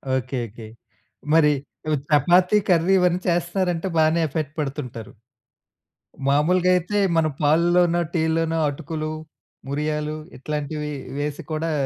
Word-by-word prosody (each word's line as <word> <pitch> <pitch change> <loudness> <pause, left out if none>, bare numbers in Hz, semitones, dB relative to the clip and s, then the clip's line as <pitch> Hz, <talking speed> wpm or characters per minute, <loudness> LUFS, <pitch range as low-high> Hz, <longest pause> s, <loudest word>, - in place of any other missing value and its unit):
Okay. 130 0 -2
Okay. 110 +1 -11 0.7
మరి 150 -2 +5 0.4
ఈవ్ 155 - +1
chapati 180 +6 +4
curry, 175 +2 +4
ఇవన్నీ 180 0 +2
చేస్తున్నారంటే, 175 +1 0
బానే 160 +1 +3
ఎఫర్ట్ 150 0 -3
పెడుతుంటారు. 130 -6 -5 1.2
మామూలుగా 175 +6 +3
అయితే, 180 +4 -1 0.2
మన 160 -1 +3
పాల్లలోనో, 175 +3 +3
టీల్లోనో, 165 0 +1
అటుకులు, 155 +2 -5 0.6
మురియాలు 150 +1 -2 0.2
ఇట్లాంటివి 150 +1 -4 0.3
వేసి 145 +3 -3
కూడా 160 +1 -1
160 Hz, 105 wpm, -23 LUFS, 150-175 Hz, 1.2 s, మరి